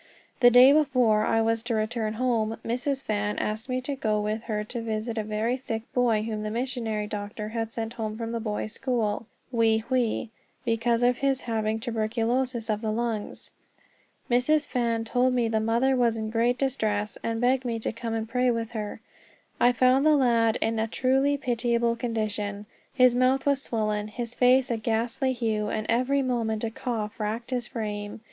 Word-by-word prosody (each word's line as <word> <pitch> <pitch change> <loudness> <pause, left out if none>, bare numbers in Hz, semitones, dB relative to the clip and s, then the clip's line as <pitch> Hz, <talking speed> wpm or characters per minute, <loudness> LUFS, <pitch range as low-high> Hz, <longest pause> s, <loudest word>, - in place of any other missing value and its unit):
The 245 -1 +8
day 250 +3 +8
before 255 -8 +3
I 225 0 +2
was 225 0 +1
to 235 0 -2
return 215 0 -1
home, 225 -2 0
Mrs. 265 +4 -1
Fan 210 -1 -1
asked 215 +4 -3
me 255 0 -1
to 275 +2 -3
go 215 -5 0
with 215 +1 -2
her 210 -2 -2
to 235 +2 -5
visit 225 0 -3
a 220 - -1
very 215 +3 -1
sick 225 -4 -4
boy 235 -4 +2
whom 215 -1 -3
the 215 - -3
missionary 230 -2 -2
doctor 210 0 -5
had 225 0 -3
sent 225 0 -4
home 215 -2 -4
from 230 0 -4
the 230 - -2
boys' 215 -1 -3
school, 230 -4 -1 0.2
Wei 225 -2 +3
Hwei, 235 -1 -1 0.4
because 230 0 +1
of 245 0 +3
his 275 -1 +1
having 220 -1 -1
tuberculosis 230 +1 -1
of 215 -1 -1
the 220 -2 -1
lungs. 225 -2 -3 0.8
Mrs. 285 +5 +2
Fan 235 -3 0
told 250 +2 +1
me 240 -2 +2
the 220 -1 +1
mother 235 +5 +2
was 235 -3 +2
in 220 0 -3
great 240 +2 +2
distress, 215 -6 -1
and 230 0 -2
begged 250 +2 +2
me 235 -2 -2
to 225 - -3
come 230 0 -4
and 225 0 -2
pray 250 +2 +1
with 230 -1 -1
her. 215 -1 -5 0.6
I 245 - +5
found 255 +2 +3
the 310 0 +5
lad 230 -4 +3
in 225 0 0
a 220 - 0
truly 270 +4 +2
pitiable 235 -2 0
condition. 210 -3 -3 0.3
His 255 -2 +5
mouth 255 +2 +2
was 280 -1 +2
swollen, 215 -4 -1
his 235 +2 -5
face 255 +1 +4
a 230 - 0
ghastly 230 +4 0
hue, 220 -3 -1
and 215 0 -2
every 255 +4 +2
moment 230 -4 -1
a 225 - -1
cough 220 -3 -4
racked 220 +4 -3
his 245 -2 -1
frame. 210 -3 -5
230 Hz, 185 wpm, -26 LUFS, 220-250 Hz, 0.8 s, The